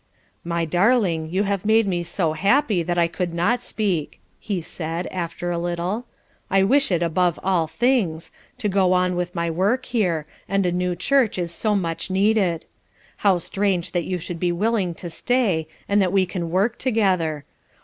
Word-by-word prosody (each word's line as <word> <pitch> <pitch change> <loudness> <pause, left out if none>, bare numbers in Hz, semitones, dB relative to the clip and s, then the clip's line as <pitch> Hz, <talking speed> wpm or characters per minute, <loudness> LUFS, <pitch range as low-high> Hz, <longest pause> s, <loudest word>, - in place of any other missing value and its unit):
"My 170 0 -1
darling, 175 -2 +2
you 190 +4 +1
have 200 -2 -1
made 220 +1 +4
me 180 -3 -1
so 170 -1 -1
happy 200 - +2
that 175 +1 -2
I 170 -1 +4
could 170 +1 -3
not 230 +8 +1
speak," 195 -10 -2 0.2
he 200 -4 -2
said, 165 +1 -4
after 175 0 -3
a 170 - -1
little. 175 +7 -2 0.4
"I 195 0 +4
wish 275 +4 +3
it 175 -1 +2
above 170 0 +1
all 180 -4 +1
things 210 -7 0 0.3
to 240 -4 -1
go 190 -2 +3
on 180 0 +2
with 175 0 -3
my 170 -1 -1
work 205 +10 +1
here, 180 -10 0 0.2
and 195 0 +1
a 175 - +2
new 180 0 -1
church 245 +4 +2
is 175 -2 -2
so 215 +2 0
much 165 -2 -2
needed. 190 -3 +2 0.5
How 195 -3 +3
strange 180 0 -1
that 175 -2 -1
you 185 - -2
should 175 0 -6
be 175 0 +1
willing 190 -1 0
to 175 - -7
stay, 175 -2 0 0.2
and 200 0 +3
that 185 -2 +1
we 190 -1 +3
can 175 -2 -4
work 200 +7 +1
together! 185 - +1
180 Hz, 180 wpm, -23 LUFS, 170-205 Hz, 0.5 s, made